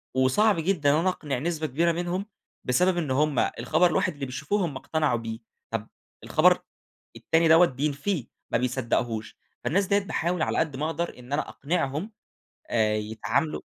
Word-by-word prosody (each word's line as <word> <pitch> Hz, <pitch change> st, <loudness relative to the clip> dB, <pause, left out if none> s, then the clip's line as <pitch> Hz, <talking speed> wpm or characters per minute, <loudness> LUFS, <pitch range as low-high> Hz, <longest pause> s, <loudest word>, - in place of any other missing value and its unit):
وصعب 165 Hz, +11 st, +3 dB
جدًا 160 Hz, -4 st, +2 dB
أنا 185 Hz, -, +2 dB
أقنِع 145 Hz, -8 st, -3 dB
نسبة 160 Hz, 0 st, -2 dB
كبيرة 165 Hz, +6 st, +2 dB
منهم 175 Hz, +3 st, -2 dB, 0.4 s
بسبب 180 Hz, +8 st, +2 dB
إن 155 Hz, -6 st, -1 dB
هُم 145 Hz, 0 st, +2 dB, 0.2 s
الخبر 125 Hz, +9 st, +3 dB
الواحد -, -, +1 dB
اللي 145 Hz, -2 st, -5 dB
بيشوفوه 150 Hz, +10 st, -1 dB
هُم 150 Hz, -5 st, -5 dB
اقتنعوا 150 Hz, -2 st, 0 dB
بيه، 115 Hz, 0 st, -5 dB, 0.3 s
طب 115 Hz, -1 st, -3 dB, 0.4 s
الخبر -, -, +4 dB, 0.6 s
التاني 165 Hz, 0 st, +2 dB
دوّة 165 Hz, +2 st, +7 dB
بينفِيه 145 Hz, -, -2 dB, 0.2 s
ما -, -, +3 dB
بيصدَّقهوش. 120 Hz, -2 st, -1 dB, 0.3 s
فالناس 195 Hz, +5 st, +2 dB
ديّة 200 Hz, +1 st, +3 dB
باحاول 180 Hz, -3 st, -2 dB
على -, -, 0 dB
قد 155 Hz, -4 st, 0 dB
ما 150 Hz, +4 st, -2 dB
أقدر 165 Hz, -2 st, -3 dB
إن 125 Hz, +3 st, -8 dB
أنا 150 Hz, -, -1 dB
أقنِعهم، 155 Hz, +5 st, -2 dB, 0.6 s
آآ 110 Hz, -2 st, +2 dB
يتعامَلوا 110 Hz, +7 st, -1 dB
150 Hz, 155 wpm, -26 LUFS, 125-170 Hz, 0.6 s, دوّة